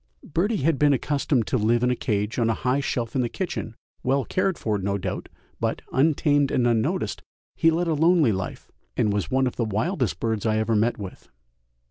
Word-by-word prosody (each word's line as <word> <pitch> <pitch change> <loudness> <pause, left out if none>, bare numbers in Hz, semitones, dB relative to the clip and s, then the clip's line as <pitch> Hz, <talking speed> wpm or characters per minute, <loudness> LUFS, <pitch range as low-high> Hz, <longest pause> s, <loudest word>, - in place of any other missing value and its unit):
Birdie 185 - -1
had 155 -2 +2
been 145 -1 +5
accustomed 140 -2 0
to 125 - 0
live 115 +3 +2
in 125 - +3
a - - +1
cage 105 0 -1
on 115 -1 +2
a 115 - +1
high 125 +2 0
shelf 120 -4 -2
in 130 - +2
the 120 - -1
kitchen, 140 - -4 0.3
well 135 0 +1
cared 185 -1 0
for, 105 -2 -1
no 100 +1 -1
doubt, 95 -1 -4 0.3
but, - - -2
untamed 145 0 +3
and 125 - +1
unnoticed, 115 -2 0 0.3
he 165 - +4
led 170 +2 0
a 165 - +2
lonely 160 -4 +4
life, 95 -2 -5 0.3
and 105 - +2
was 100 -5 -1
one 130 0 +2
of 125 - -3
the 120 - +1
wildest 110 - -1
birds 110 -3 -1
I 110 -1 +1
ever 110 +1 +1
met 110 +3 +2
with. 100 -3 -9
125 Hz, 205 wpm, -24 LUFS, 110-145 Hz, 0.3 s, been